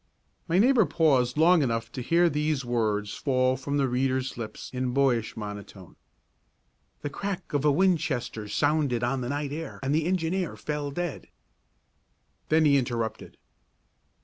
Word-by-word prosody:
My 170 - +1
neighbour 230 0 +5
paused 135 -6 +2
long 170 +2 +5
enough 115 -4 -1
to 130 - -5
hear 170 +7 +3
these 150 -3 -1
words 105 -4 -1
fall 130 -2 +1
from 140 +2 -3
the 140 -2 +2
reader's 130 +1 -1
lips 115 -2 -7
in 125 0 -2
boyish 125 -5 +1
monotone: 105 -3 -8 1.1
"The 145 - -4
crack 195 +3 -5
of 145 -1 +1
a 150 - +5
Winchester 140 - 0
sounded 145 +1 +1
on 130 +2 0
the 120 - -3
night 145 0 -2
air 160 +2 -6
and 135 +1 0
the 155 +1 +1
engineer 180 -1 -1
fell 150 -1 -3
dead!" 175 +1 -4 1.2
Then 160 0 +4
he 140 -2 +5
interrupted. 115 -3 -4
140 Hz, 150 wpm, -27 LUFS, 120-160 Hz, 1.2 s, neighbour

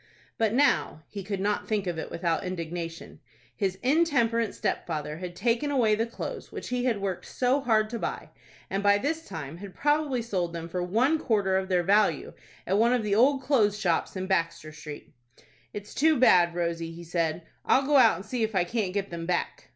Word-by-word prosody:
But 225 0 +2
now—he 210 - +1
could 195 0 -4
not 205 +2 -1
think 210 -3 -1
of 175 -3 -3
it - - -5
without 170 -1 -1
indignation—his 170 - -5
intemperate 245 -7 +2
stepfather 150 -2 -3
had 180 -1 -6
taken 240 +7 0
away 245 -6 +3
the 225 +2 0
clothes 230 - -7
which - - -7
he 250 0 -1
had 230 -5 +1
worked 195 -2 -4
so 255 +3 +1
hard 220 -4 +2
to 235 - -3
buy, - - -4 0.4
and, 195 +1 -2
by 205 0 +4
this 315 +8 -3
time, 155 0 -7
had 195 0 -10
probably 290 -4 +1
sold 180 -7 -2
them 165 0 -5
for 180 +1 -3
one 240 - +2
quarter 200 -7 +1
of 190 0 -1
their 180 -2 +2
value 205 +4 +2 0.3
at 195 - +1
one 235 +2 +4
of 245 -3 +1
the 210 -1 0
old 265 +5 +4
clothes 215 -8 +2
shops 180 -4 0
in 185 0 -3
Baxter 165 -4 -1
Street. 150 -1 -10 0.6
"It's 205 0 -8
too 315 +1 +3
bad, 175 -8 +5
Rosie!" 170 -1 -2
he 170 +1 -10
said. 165 -1 -1 0.2
"I'll 270 - +3
go 290 0 +4
out, 235 -4 +6
and 190 - -8
see 240 +2 -3
if 220 -1 -1
I 180 - +3
can't 195 0 -2
get 200 -2 -2
them 165 -1 -5
back." 180 -1 -2
200 Hz, 195 wpm, -27 LUFS, 175-235 Hz, 0.6 s, out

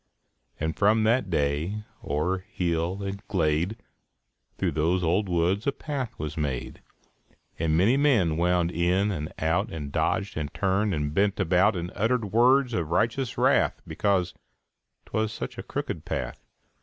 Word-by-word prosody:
And 80 +1 -1
from 110 +2 +3
that 115 -2 +2
day, 80 +6 -1 0.2
oŌĆÖer 85 +6 -1
hill 85 +2 -1
and 100 +1 -5
glade, 85 +3 0 0.8
Through - - 0
those 85 +4 +1
old 90 +4 +1
woods 90 +6 +1
a - - +4
path 140 -4 -5
was 75 -1 -4
made; 70 -5 -3 0.8
And 80 -1 +1
many 110 +10 +4
men 115 - +3
wound 90 0 +2
in 90 +4 +1
and 75 -5 -4
out, 85 +7 0
And 75 -3 -5
dodged, 100 +6 0
and 75 -2 -3
turned, 100 0 +1
and 75 -1 -2
bent 100 +3 +1
about 95 +3 +3
And 85 0 -4
uttered 110 -1 0
words 125 +2 +4
of 85 -7 -1
righteous 115 +8 0
wrath - - +3
Because 90 +2 0 0.7
ŌĆśtwas 110 0 -1
such 110 - -6
a - - -5
crooked - - -4
path. - - -4
95 Hz, 150 wpm, -26 LUFS, 80-105 Hz, 0.8 s, a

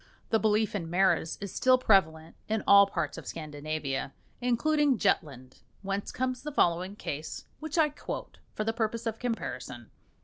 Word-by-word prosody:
The 225 - +4
belief 215 0 +2
in 170 -6 -3
maras 180 -2 +2
is 200 -2 -5
still 255 0 +4
prevalent 165 -9 +2
in 220 0 0
all 200 0 +8
parts - - -3
of - - -12
Scandinavia, 150 -3 -4 0.3
including 275 +3 +2
Jutland, 140 - -1 0.2
whence 195 +1 -3
comes 255 -1 -2
the 300 - -5
following 180 -5 +1
case 155 -5 -5
which 315 +1 -5
I 310 -2 +5
quote 295 - -7 0.2
for 215 - -1
the 225 +1 -1
purpose 230 0 -2
of 225 -1 -3
comparison. 240 -2 -5
205 Hz, 160 wpm, -29 LUFS, 165-245 Hz, 0.3 s, all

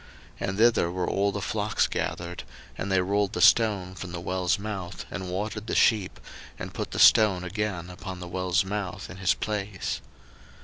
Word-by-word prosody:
01:029:003 - - -2
And 95 - -3
thither 115 -6 +4
were 90 0 -2
all 100 +1 +1
the 100 +1 -4
flocks 105 0 +1
gathered: 85 +1 -3 0.3
and 95 - -4
they 95 -1 +4
rolled 100 +2 0
the - - -2
stone 100 -5 +4
from 95 -1 -7
the 85 - -5
well's 90 +1 0
mouth, 100 -3 -5
and 95 -2 -5
watered 105 +4 -3
the - - -1
sheep, 105 -5 +3 0.4
and - - -7
put - - -4
the - - -6
stone 100 -5 +6
again 95 -2 -3
upon 90 0 -7
the 90 - -7
well's 90 +1 0
mouth 100 -1 -4
in 95 - -9
his 95 -1 +2
place. 105 -3 -3
95 Hz, 185 wpm, -27 LUFS, 90-105 Hz, 0.4 s, stone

